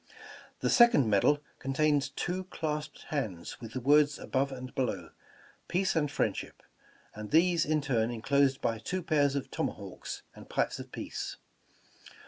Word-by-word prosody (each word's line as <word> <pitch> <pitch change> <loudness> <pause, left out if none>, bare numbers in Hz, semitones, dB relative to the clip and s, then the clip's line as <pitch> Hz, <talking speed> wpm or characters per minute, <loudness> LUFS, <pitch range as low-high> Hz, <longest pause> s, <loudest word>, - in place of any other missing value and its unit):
The - - +1
second 235 - +6
medal 110 +8 +3 0.2
contains 145 +1 +1
two 180 +6 -3
clasped 150 -4 -4
hands, 110 - -4
with 115 -1 -8
the 130 - -2
words 145 +2 +4
above 135 +1 -1
and 130 -1 -7
below, 95 -10 -2 0.6
"Peace 190 +1 +1
and 150 -3 +2
Friendship," 145 - -2 0.5
and 105 0 -7
these, 170 +2 +4
in 155 0 +2
turn, 120 -5 +1
enclosed 135 +3 +2
by 115 -1 0
two 185 +11 -3
pairs 145 -4 +2
of 140 - -3
tomahawks - - -4
and - - -13
pipes - - 0
of - - -9
peace. - - -5
140 Hz, 145 wpm, -30 LUFS, 125-155 Hz, 0.6 s, second